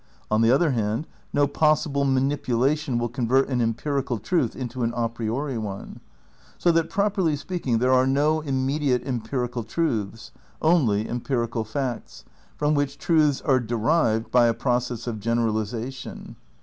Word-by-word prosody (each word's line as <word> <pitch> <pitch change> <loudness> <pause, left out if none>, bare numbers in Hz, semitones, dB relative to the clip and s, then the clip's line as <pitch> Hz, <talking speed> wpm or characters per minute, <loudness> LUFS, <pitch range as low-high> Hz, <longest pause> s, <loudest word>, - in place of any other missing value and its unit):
On 110 +1 +3
the 115 - +4
other 145 +5 +4
hand 110 +3 -1 0.3
no 145 - +3
pos 155 +1 +2
sible 140 -2 0
manipulation 135 +1 +1
will 120 0 0
convert 125 +3 +1
an 125 -2 0
empirical 125 +3 -1
truth 120 - 0
into 125 -1 -5
an 115 0 +1
a 120 -1 +1
priori 115 +3 -3
one. 100 -3 -6 0.6
So 175 - +3
that, 165 -1 +1
properly 195 -6 +1
speaking, 145 -6 -2
there 125 +3 +2
are 130 0 +4
no 150 +4 +2
immediate 135 -1 0
empirical 125 -1 -3
truths, 115 -8 -2 0.3
only 125 -11 +2
empirical 120 -2 -2
facts, 120 +2 -5 0.3
from 150 0 +1
which 145 -1 0
truths 150 -3 +2
are 135 -3 +3
derived 115 0 +1
by 120 -1 +5
a 115 - +1
process 120 -1 -1
of 115 -3 -4
general 115 +1 +1
isation. 115 +4 -5
125 Hz, 150 wpm, -24 LUFS, 115-145 Hz, 0.6 s, by